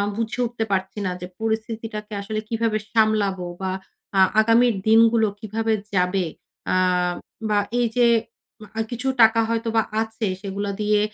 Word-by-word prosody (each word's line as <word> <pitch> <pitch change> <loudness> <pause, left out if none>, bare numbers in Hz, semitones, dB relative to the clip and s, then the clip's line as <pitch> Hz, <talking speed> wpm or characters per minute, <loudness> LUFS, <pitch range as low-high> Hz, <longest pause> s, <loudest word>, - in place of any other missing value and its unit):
বুঝে 230 +2 -3
উঠতে 230 -1 -3
পারছি 190 +2 -1
না 180 - 0
যে 180 - -5
পরিস্থিতিটাকে 220 -1 -3
আসলে 215 +1 -3
কিভাবে 225 -1 0
সামলাবো 210 -5 +2 0.2
বা, 190 -1 -1 0.5
আ - - +5 0.2
আগামীর 230 +1 +4
দিনগুলো 225 0 +5
কিভাবে 220 +1 -1 0.2
যাবে? 180 0 +2 0.5
আ - - +3 0.7
বা, 210 - +2 0.2
এইযে 240 0 +3 0.7
আ - - 0
কিছু 250 +3 -3
টাকা 225 +1 +6
হয়তোবা 230 -1 +1 0.2
আছে, 220 0 -3 0.2
সেগুলা 200 +1 -3
দিয়ে 210 0 +3
220 Hz, 135 wpm, -23 LUFS, 205-230 Hz, 0.7 s, টাকা